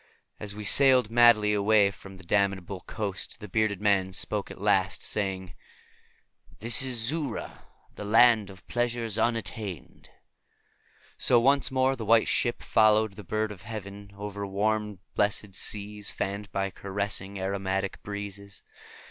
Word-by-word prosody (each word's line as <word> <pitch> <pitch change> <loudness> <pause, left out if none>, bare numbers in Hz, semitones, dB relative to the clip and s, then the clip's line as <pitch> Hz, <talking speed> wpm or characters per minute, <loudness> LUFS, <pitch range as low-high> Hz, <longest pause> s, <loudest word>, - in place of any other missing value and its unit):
And - - -6
as 100 0 -6
we 105 0 -7
sailed 130 -1 +5
madly 115 -3 +5
away 105 0 +3
from 95 -1 -13
that 95 - -14
damnable 100 -1 -1
coast 105 -1 -4
the 105 - -9
bearded 105 -1 0
man 100 -2 +1
spoke 105 +2 -2
at - - -10
last, 95 -2 +1
saying, 95 -3 -1 1.0
"This 115 +1 +4
is 125 -2 +3
Xura, 150 -7 -5 0.3
the - - -8
Land 110 -1 +4
of 95 -1 -15
Pleasures 120 -3 -1
Unattained." 110 -6 -4 1.1
So 120 - +4
once 140 +3 +3
more 130 0 +1
the 120 - -7
White 110 +1 +4
Ship 120 - 0
followed 110 -1 +3
the 105 - -10
bird 110 +3 -2
of 100 - -10
heaven, 100 -1 -8
over 100 0 -6
warm 105 0 -1
blessed 105 -1 -1
seas 105 +1 -5
fanned 100 +1 -4
by 95 0 -2
caressing, 100 0 -4
aromatic 95 0 -3
breezes. 100 -1 -8
105 Hz, 140 wpm, -27 LUFS, 100-110 Hz, 1.1 s, sailed